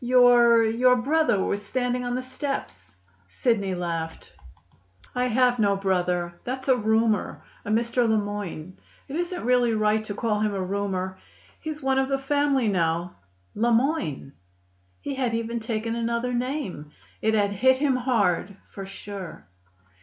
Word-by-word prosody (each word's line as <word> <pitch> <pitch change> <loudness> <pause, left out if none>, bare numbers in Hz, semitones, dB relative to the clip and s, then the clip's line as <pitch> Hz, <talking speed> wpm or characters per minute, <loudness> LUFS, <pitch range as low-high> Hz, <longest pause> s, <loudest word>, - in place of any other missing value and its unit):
Your 240 -2 +6
your 250 +3 +4
brother 265 -5 +2
was 205 +1 -2
standing 250 +3 -1
on 245 0 -2
the 255 - -3
steps." 255 - -5 0.3
Sidney 200 - 0
laughed. 165 -2 -5 0.8
"I 250 0 0
have 245 0 +2
no 200 -2 +3
brother. 180 -3 -1
That's 260 +2 -5
a 260 - +5
roomer, 220 -1 +1 0.2
a - - -7
Mr. 235 +2 +1
Le 220 - +3
Moyne. 205 -4 -5 0.3
It 275 - -6
isn't 350 -1 -3
really 245 -2 +3
right 215 0 +2
to 205 - -5
call 215 -2 0
him 210 -1 0
a 190 - -1
roomer; 190 -1 -3 0.4
he's 310 -2 -6
one 265 0 +2
of 265 0 0
the 275 - +1
family 275 -2 +1
now." 170 -2 0 0.4
"Le 235 +3 +1
Moyne!" 225 - 0 0.7
He 285 - -4
had 255 -4 -1
even 230 +1 -2
taken 225 0 -3
another 235 +1 -1
name. 245 - -3 0.3
It 220 0 +2
had 205 -1 +2
hit 255 +6 +3
him 270 -2 +1
hard, 205 -6 0
for 195 -1 -7
sure. 195 - -8
230 Hz, 155 wpm, -25 LUFS, 200-250 Hz, 0.8 s, Your